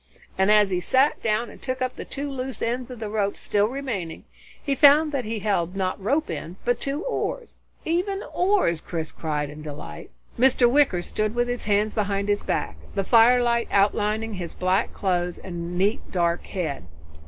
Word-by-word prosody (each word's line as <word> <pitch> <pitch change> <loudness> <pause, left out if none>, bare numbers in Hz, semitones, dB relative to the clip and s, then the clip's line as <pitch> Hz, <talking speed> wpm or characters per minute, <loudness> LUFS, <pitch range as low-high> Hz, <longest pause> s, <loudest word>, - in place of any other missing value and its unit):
and 190 +1 +2
as 210 -2 +5
he 180 - +1
sat 265 +10 +2
down 225 +1 0
and - - -15
took 260 -1 -3
up 255 0 -2
the - - -6
two 285 +1 -5
loose 265 -1 -5
ends 245 +2 -2
of 250 -2 -8
rope 205 -1 -1
still 205 0 +1
remaining, 230 -10 -4 0.4
he 280 - 0
found 295 +3 +6
that 275 -5 -2
he 220 +1 -3
held 195 -4 -1
not 190 0 -2
rope 280 +10 +1
ends 170 +4 -6
but 245 0 +1
two 280 +5 -2
oars. - - -3 0.3
"Even 370 +5 -1
oars!" 360 - +2
Chris 160 -2 -4
cried 150 -2 -2
in 150 +1 -10
delight. 145 - -8 0.3
Mr. 250 -1 +5
Wicker 245 -9 +3
stood 215 +4 -2
with 240 0 +1
his 245 0 -3
hands 210 +1 +1
behind 200 -1 -1
his 205 0 +1
back, 80 - -2 0.2
the 195 - +1
firelight 235 +2 +4
outlining 210 +2 +1
his 180 -3 -5
black 185 +4 +1
clothes 180 -3 -1
and 175 -1 -6
neat 200 +4 +1
dark 170 -1 0
head. 155 - -4
215 Hz, 180 wpm, -24 LUFS, 185-255 Hz, 0.4 s, found